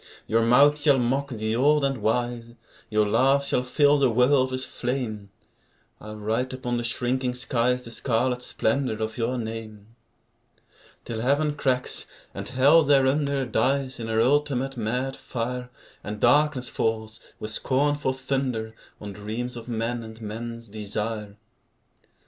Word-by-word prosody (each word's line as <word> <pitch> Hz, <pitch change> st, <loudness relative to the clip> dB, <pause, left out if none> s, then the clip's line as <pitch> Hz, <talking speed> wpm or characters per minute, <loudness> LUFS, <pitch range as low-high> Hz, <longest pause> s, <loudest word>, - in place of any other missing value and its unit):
Your 115 Hz, +1 st, +2 dB
mouth 140 Hz, +6 st, +5 dB
shall 145 Hz, -2 st, +4 dB
mock 135 Hz, +3 st, 0 dB
the 110 Hz, -2 st, -2 dB
old 145 Hz, +4 st, +3 dB
and 135 Hz, -2 st, 0 dB
wise, 120 Hz, +1 st, -1 dB, 0.3 s
Your 105 Hz, -1 st, +2 dB
laugh 135 Hz, +6 st, +3 dB
shall 125 Hz, -, +1 dB
fill 145 Hz, +3 st, +3 dB
the 135 Hz, -2 st, +4 dB
world 130 Hz, +3 st, +3 dB
with 130 Hz, 0 st, -3 dB
flame, 120 Hz, -5 st, -4 dB, 0.7 s
I'll 105 Hz, 0 st, -9 dB
write 115 Hz, +5 st, -2 dB
upon 125 Hz, -2 st, -2 dB
the 120 Hz, -, -2 dB
shrinking 125 Hz, +2 st, -1 dB
skies 125 Hz, 0 st, 0 dB
The 115 Hz, -, -8 dB
scarlet 125 Hz, +1 st, 0 dB
splendour 125 Hz, -1 st, -1 dB
of 110 Hz, +2 st, -3 dB
your 120 Hz, +2 st, 0 dB
name, 110 Hz, -1 st, -7 dB, 1.1 s
Till 110 Hz, -1 st, -4 dB
Heaven 145 Hz, +4 st, +2 dB
cracks, 130 Hz, -3 st, -1 dB, 0.3 s
and -, -, -6 dB
Hell 140 Hz, +6 st, +5 dB
thereunder 140 Hz, -1 st, +2 dB
Dies 135 Hz, +1 st, 0 dB
in 115 Hz, -, -4 dB
her 110 Hz, 0 st, +2 dB
ultimate 135 Hz, 0 st, +1 dB
mad 125 Hz, +4 st, -2 dB
fire, 125 Hz, +1 st, -4 dB, 0.3 s
And 105 Hz, 0 st, -5 dB
darkness 135 Hz, +1 st, +3 dB
falls, 110 Hz, -1 st, -2 dB, 0.2 s
with 110 Hz, -, -4 dB
scornful 140 Hz, +3 st, +1 dB
thunder, 130 Hz, -4 st, -2 dB, 0.3 s
On 105 Hz, -1 st, -7 dB
dreams 110 Hz, +5 st, -5 dB
of 120 Hz, 0 st, -8 dB
men 115 Hz, +1 st, -2 dB
and 110 Hz, 0 st, -10 dB
men's 115 Hz, +2 st, -6 dB
desire. 105 Hz, 0 st, -4 dB
125 Hz, 145 wpm, -25 LUFS, 110-135 Hz, 1.1 s, mouth